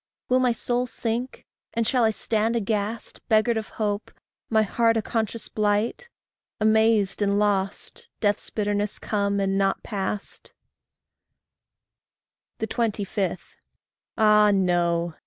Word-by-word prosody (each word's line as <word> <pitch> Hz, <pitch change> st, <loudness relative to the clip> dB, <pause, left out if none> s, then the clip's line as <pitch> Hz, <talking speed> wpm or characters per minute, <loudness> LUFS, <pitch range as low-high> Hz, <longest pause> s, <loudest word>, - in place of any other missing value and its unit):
Will 255 Hz, +1 st, +4 dB
my 250 Hz, -1 st, +3 dB
soul 245 Hz, +2 st, -1 dB
sink, 235 Hz, +2 st, -4 dB, 0.3 s
and 230 Hz, 0 st, +1 dB
shall 245 Hz, +1 st, +2 dB
I 220 Hz, -, +5 dB
stand 220 Hz, +1 st, 0 dB
aghast, 215 Hz, 0 st, -2 dB
Beggared 220 Hz, +1 st, +3 dB
of 220 Hz, -, -3 dB
hope, 210 Hz, -1 st, -2 dB, 0.4 s
my 220 Hz, -1 st, +4 dB
heart 230 Hz, +2 st, +2 dB
a -, -, +1 dB
conscious 225 Hz, 0 st, -2 dB
blight, 215 Hz, -, 0 dB, 0.5 s
Amazed 220 Hz, -2 st, +3 dB
and 200 Hz, 0 st, +2 dB
lost 205 Hz, -, -1 dB
death's 205 Hz, -2 st, 0 dB
bitterness 205 Hz, -1 st, -1 dB
come 200 Hz, -1 st, -1 dB
and 195 Hz, 0 st, +1 dB
not 195 Hz, 0 st, +1 dB
passed? 205 Hz, -1 st, -5 dB, 2.1 s
25. 200 Hz, -6 st, -2 dB, 0.6 s
Ah, 210 Hz, -1 st, +5 dB
no! 175 Hz, -3 st, +1 dB
215 Hz, 115 wpm, -25 LUFS, 200-230 Hz, 2.1 s, I